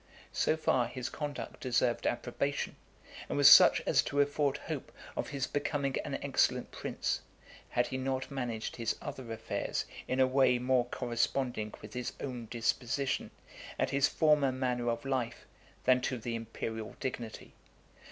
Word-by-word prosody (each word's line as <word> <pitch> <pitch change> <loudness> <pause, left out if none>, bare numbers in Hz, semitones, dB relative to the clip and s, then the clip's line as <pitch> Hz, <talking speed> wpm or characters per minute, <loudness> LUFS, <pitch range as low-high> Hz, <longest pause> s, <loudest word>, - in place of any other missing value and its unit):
So 155 - +2
far 125 -6 +2
his 125 +1 -4
conduct 145 +1 -5
deserved 120 -1 +1
approbation, 140 +4 -1 0.5
and - - -1
was - - +7
such - - +9
as - - +4
to 145 - -1
afford 145 0 +2
hope - - -5 0.2
of - - -2
his 135 -2 -1
becoming 140 -2 -1
an - - -3
excellent - - +1
prince, - - -2 0.5
had 120 - +2
he 130 - -3
not 130 +1 -2
managed 120 -5 -3
his 115 -2 0
other 130 -5 -7
affairs 115 - -2 0.2
in 130 - -1
a 130 - +7
way 130 -1 +4
more 125 0 +2
corresponding 120 -2 -1
with 105 - -9
his 125 -1 -3
own 125 -4 -5
disposition, 125 +3 0 0.5
and - - 0
his 140 0 +4
former 150 -4 +3
manner 125 -2 -1
of 115 +2 -2
life, 130 -4 -2 0.4
than 125 0 +4
to 130 0 -1
the 115 +1 -4
imperial 115 -1 -5
dignity. 120 -4 -5
130 Hz, 150 wpm, -32 LUFS, 120-135 Hz, 0.5 s, such